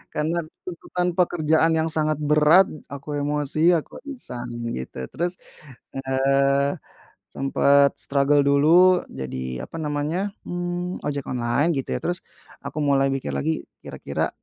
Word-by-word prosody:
karena 160 +3 0 0.2
tuntutan 180 0 -3
pekerjaan 165 -2 +2
yang 160 - +1
sangat 155 -1 0
berat, 150 +5 +5 0.2
aku 140 +1 -6
emosi, 150 +3 +2
aku 165 - -2
iseng 125 - -7 0.2
gitu, 65 0 -7
terus, 175 +2 -3 0.5
eee, 135 +1 +2 0.6
sempet 140 +1 +3
struggle 140 +1 +2
dulu, 170 +6 +5
jadi, 65 -1 -5
apa - - -9
namanya, 155 +7 -1 0.2
mmm, 175 0 -4
ojek 145 -2 -3
online, 125 +7 0
gitu 135 -2 -2
ya, - - -6
terus 175 0 -2 0.4
aku - - -8
mulai 135 -1 +3
mikir 135 - -3
lagi 70 +1 -2 0.2
kira-kira - - -3
150 Hz, 125 wpm, -23 LUFS, 135-170 Hz, 0.6 s, berat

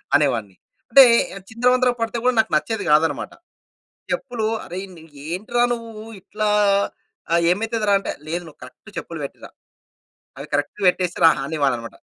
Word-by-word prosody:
అనేవాడిని. 120 -10 +1 0.4
అంటే 270 +3 +10 0.3
ఆహ్, 195 - -12
చిందరవందర 250 +2 +3
పడితే 230 +1 -1
కూడా 255 - +4
నాకు 220 - +2
నచ్చేది 215 +7 -1
కాదన్నమాట. 150 -1 +2 0.8
చెప్పులు 240 -5 -3 0.2
"అరేయ్‌! 185 +3 -6
నీ 160 - -14 0.3
ఏంట్రా 230 +6 0
నువ్వు 225 -2 -8 0.2
ఇట్లా 210 +3 -2 0.8
ఆ - - +6 0.2
ఏమైతదిరా" 215 +1 +1
అంటే - - -4 0.2
లేదు 175 +2 -3
నువ్వు 155 - -15
కరెక్ట్ - - -16
చెప్పులు - - -8
పెట్టిరా. - - -11 0.9
అవి 140 +2 -8
కరెక్ట్‌గా 145 +7 -2
పెట్టేసి 180 -1 -3
రా - - +9 0.2
అనేవాన్ననమాట. 135 -6 -2
195 Hz, 140 wpm, -21 LUFS, 155-225 Hz, 0.9 s, అంటే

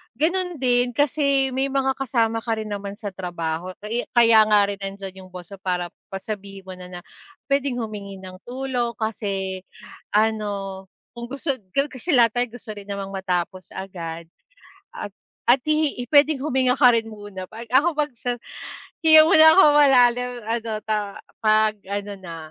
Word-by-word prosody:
Gano'n 355 +6 0
din, 245 -1 +2
kasi 280 -1 +2
may 265 +2 0
mga 270 -1 +1
kasama 230 -4 0
ka 225 0 -2
rin 215 -1 -5
naman 200 -1 -5
sa 205 -1 -6
trabaho, 175 -1 -4
kaya 230 +3 -2
kaya 230 -2 +7
nga 210 -1 +5
rin 200 -1 -5
nandiyan 195 -1 -7
'yung 185 - -18
boss 180 0 -9
mo 200 - -8
para 180 -2 -2 0.2
pa 195 0 -6
sabihin 195 -2 -7
mo 190 - -10
na 180 0 -10
na 180 -1 -9 0.5
puwedeng 275 -3 0
humingi 205 -3 -6
ng 185 -1 -10
tulong, 250 -2 -2
kasi 200 -4 -3 0.5
ano, 205 -3 -1 0.3
kung 235 0 -6
gusto 275 +1 -1 0.2
ko 275 +1 +1
kasi 285 +7 -3
lahat 235 -2 +5
tayo 245 +1 +1
gusto 230 -3 -8
rin 205 0 -10
namang 200 -1 -5
matapos 185 -1 -3
agad, 170 -3 -7 0.7
at 205 - -6 0.4
at 245 +2 +6
hi 305 -5 0
puwedeng 290 +1 +4
huminga 260 -3 +1
ka 250 -3 +8
rin 225 -1 0
muna. 205 -3 -8
'Pag 230 +2 -9
ako, 285 +8 +3
'pag 295 0 +1
sa 245 +1 -3 0.6
hinga 315 -1 +8
muna 315 -1 +7
ako 385 - +7
malalim, 250 -4 +5 0.2
ano 230 0 -2 0.2
ta 210 -2 -2 0.2
pag-ano 210 -2 +1
na, 170 -3 -8
220 Hz, 165 wpm, -23 LUFS, 195-260 Hz, 0.7 s, ka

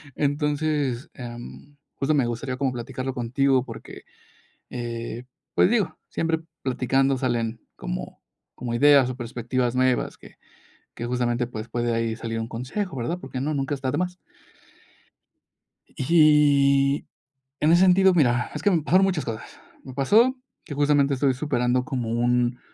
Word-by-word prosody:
Entonces, 145 -3 -1
em, 120 +3 -10 0.2
justo 140 +2 0
me 135 -5 +2
gustaría 125 +2 -4
como 135 -1 0
platicarlo 130 +2 -5
contigo 130 +2 +1
porque, - - -10 0.7
eh, 120 0 -5 0.3
pues, 195 - +4
digo, 215 -7 0
siempre 165 0 -1 0.2
platicando 135 +1 +1
salen 115 -3 -1 0.2
como - - -6 0.3
como 120 -1 -5
ideas 140 +1 +5
o 130 - -4
perspectivas 120 0 -2
nuevas 130 -1 +1
que - - -16 0.6
que 120 - -5
justamente, 120 0 0
pues, 110 -1 -7
puede 120 0 -1
ahí 115 -1 -1
salir 115 0 -4
un 115 - -3
consejo, 135 - -4
¿verdad?, 145 +9 -2
porque 130 -3 -6
no, 150 +3 -1
nunca 140 0 -1
está 130 -1 -2
de 145 - -2
más. 180 0 -2 1.7
Y, 140 -2 +4 0.5
en 155 - +3
ese 175 +1 +5
sentido, 190 0 +5
mira, 120 -7 +2
es 150 - -6
que 205 - +4
me 170 -3 +2
pasaron 185 +7 +4
muchas 175 -8 -1
cosas, 115 -2 -7 0.2
me 130 - -9
pasó 215 - +4 0.3
que - - -7
justamente 145 -1 +3
estoy 135 0 +2
superando 125 -2 0
como 125 -5 -3
un, 120 +1 +1
130 Hz, 150 wpm, -24 LUFS, 120-150 Hz, 1.7 s, ideas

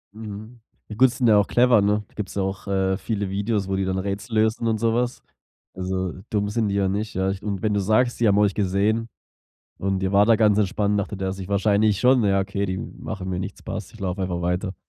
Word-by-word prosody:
Mhm. 110 +2 -9 0.3
I 105 - -6
gut, 130 +4 +5
die - - -9
sind 125 -1 +1
ja 105 -2 +6
auch 100 - +3
clever, 120 -3 +4
ne? 105 +1 +1
Gibt's 100 -3 -5
ja 100 - 0
auch, 95 0 -4
äh, 95 -1 +1
viele 105 -2 -3
Videos, 100 0 -1
wo 95 - -1
die 95 - 0
dann 95 0 -1
Rätsel 100 +4 -4
lösen 110 +1 +1
und 110 -1 0
so 115 0 +1
was. 125 +1 -1 0.5
Also, 95 -1 -3 0.2
dumm 105 -1 0
sind 110 0 0
die 100 - -1
ja 100 -1 +2
nicht, 105 +3 -3
ja. 95 +1 +1
Ich 95 - -6
und 100 -3 -4
wenn 105 -1 +1
du 100 - +1
sagst, 110 +5 +1
die 120 - +3
haben 100 0 +4
euch 105 -1 +3
gesehen 105 +4 0 0.7
und 95 0 -1
ihr 95 - 0
wart 100 +2 +4
da 115 - +7
ganz 105 -2 +3
entspannt, 105 0 +1
dachte 100 +1 -3
der 95 0 -2
sich 95 -1 -7
wahrscheinlich 100 0 +2
schon: 125 +2 +5
„Na 105 - +2
ja, 100 0 +3
okay, 100 +1 -2
die 95 0 -2
machen 95 -1 -6
mir 90 -1 -2
nichts 90 - -6
passt. - - -6
Ich 110 - -15
lauf 95 0 -3
einfach 90 -2 -2
weiter.“ 90 +2 -1
100 Hz, 250 wpm, -23 LUFS, 95-110 Hz, 0.7 s, da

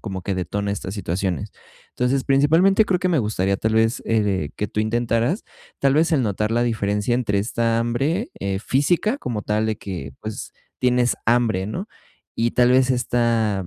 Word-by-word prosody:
como 95 -4 -5
que 95 0 -2
detona 100 +3 -2
estas 100 -1 -4
situaciones. 95 -4 -2 0.4
Entonces, 130 +2 0
principalmente 165 +10 +4
creo 180 -3 0
que 185 - +1
me 165 -4 +2
gustaría, 100 -3 0
tal 110 +2 -1
vez, 115 +1 +2
eh, 100 -8 0
que 105 - -3
tú 105 - -5
intentaras, 115 - 0 0.4
tal 135 0 +3
vez, 160 +3 +3
el 135 -5 +3
notar 105 +1 -1
la 120 +1 +2
diferencia 105 -1 0
entre 105 -5 0
esta 115 +1 0
hambre, 140 - -1
eh, 95 0 -2
física, 175 - +1
como 110 -4 -4
tal, 105 +1 0
de 110 - -1
que, 85 -9 -7
pues, 110 -1 -6 0.3
tienes 125 -1 +2
hambre, 115 -5 +2
¿no? 185 - -5 0.5
Y 115 +1 +1
tal 125 0 +4
vez, 130 0 +4
esta, 115 -6 0
115 Hz, 175 wpm, -22 LUFS, 100-130 Hz, 0.5 s, principalmente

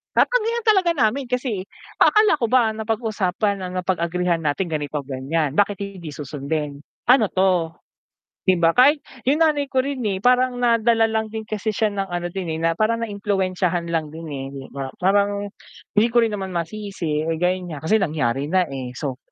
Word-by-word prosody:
Tatanggihan 470 -1 +2
talaga 385 -6 +3
namin 260 0 +1
kasi, 245 -6 -2 0.3
akala 425 -7 +5
ko 235 - 0
ba 235 -1 +3
napag-usapan 215 -3 -1
ang 180 - -6
napag-agrihan 175 -2 -1
natin 170 +5 0
ganito-ganyan, 145 0 -2
bakit 205 -1 +2
hindi 185 -6 -7
susundin? 145 0 -4 0.2
Ano 250 -3 +6
'to 180 -4 +2 0.7
di 185 - +5
ba, 165 +6 +3
kahit 285 +4 +6 0.2
yung 290 +5 +2
nanay 300 -3 +3
ko 265 -1 +1
rin, 265 -3 -4
eh, 195 -2 -1
parang 250 0 +3
nadala 230 -1 +3
lang 220 0 -2
din 220 - -3
kasi 215 0 -2
siya 215 +1 +1
ng 200 -1 -2
ano 175 0 -2
din, 175 -3 -4
eh, 160 - -3
na 165 0 +1
parang 230 +2 +1
naimpluwensyahan 190 -5 -1
lang 155 -2 -2
din, 160 -1 -8
eh, 135 -2 -5
'di 135 -1 -8
ba. 135 -1 -6
Parang 200 +1 +2 0.5
hindi 220 +3 +6
ko 240 - +5
rin 225 - +2
naman 195 -3 -4
masisi, 170 -4 -3
eh, 165 0 -1
ganyan 180 -1 0
nga, 145 - -6
kasi 220 - +5
nangyari 145 - 0
na, 185 +4 +2
eh, 130 -2 -6
so. 130 -1 -4
195 Hz, 175 wpm, -22 LUFS, 165-225 Hz, 0.7 s, Ano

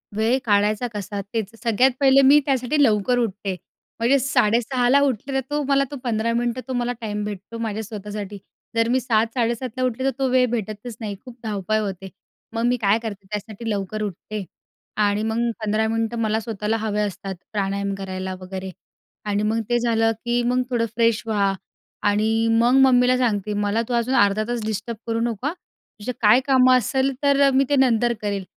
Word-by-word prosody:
वेळ 225 +4 +2
काढायचा 210 +2 +2
कसा 205 0 -4
तेच. 220 -4 -1
सगळ्यात 245 +3 +3
पहिले 275 -1 +6
मी 290 +2 +8
त्यासाठी 270 +2 +1
लवकर 220 0 +2
उठते. 200 -4 -2 0.4
म्हणजे 240 +5 +4
6:30 245 0 +1
ला 275 +3 +6
उठले, 275 -1 -1
तर 270 - +2
तो 295 0 0
मला 275 0 +3
तो - - -5
15 230 -1 0
मिनिटं 240 +1 -1
तो 260 - -3
मला 245 0 -1
टाईम 210 -2 -3
भेटतो 210 +2 -7
माझ्या 220 -1 -3
स्वतःसाठी. 210 -1 -6 0.4
जर 230 0 +2
मी 255 +2 +3
7:00-7:30 235 +1 0
ला 255 - 0
उठले 255 0 -1
तर 270 - +4
तो 270 - +2
वेळ 255 0 +4
भेटतच 220 0 -4
नाही. 210 -2 -4
खूप 250 -1 -11
धावपळ 215 0 -1
होते. 195 -2 -5 0.4
मग 230 0 -1
मी 245 +1 +2
काय 205 +2 +3
करते 200 -3 -6
त्यासाठी 215 +2 -5
लवकर 205 0 -3
उठते 210 +1 -5 0.5
आणि 205 0 +2
मग 220 0 -1 0.3
15 215 +1 +1
मिनिटं 225 +1 -1
मला 220 -1 +1
स्वतःला 220 0 -2
हवे 215 -1 -1
असतात 195 -1 -4 0.2
प्राणायाम 200 -1 -1
करायला 190 -1 -5
वगैरे. 190 0 -6 0.5
आणि 205 0 0
मग 220 +2 +1
ते 240 0 +2
झालं, 225 -1 +2
की 240 0 +1
मग 250 +1 +1
थोडं 240 -2 +1
फ्रेश 230 -2 +2
व्हा 200 -3 +1 0.6
आणि 220 +2 +1
मग 240 +2 +4
मम्मीला 255 -1 +5
सांगते, 215 -5 0
"मला 205 +2 0
तू 250 - -3
अजून 240 +2 +1
अर्धा 205 -2 +3
तास 240 -1 -2
डिस्टर्ब 220 +1 -3
करू 230 0 0
नको 235 +2 -2
हां, 305 - -1 0.5
तुझं 210 +5 -3
काय 220 +3 +6
कामं 255 -2 +5
असेल, 265 +3 0
तर 280 0 +4
मी 270 +1 +4
ते 290 - +3
नंतर 240 -3 +3
करेल." 200 -2 -2
225 Hz, 185 wpm, -22 LUFS, 210-245 Hz, 0.6 s, मी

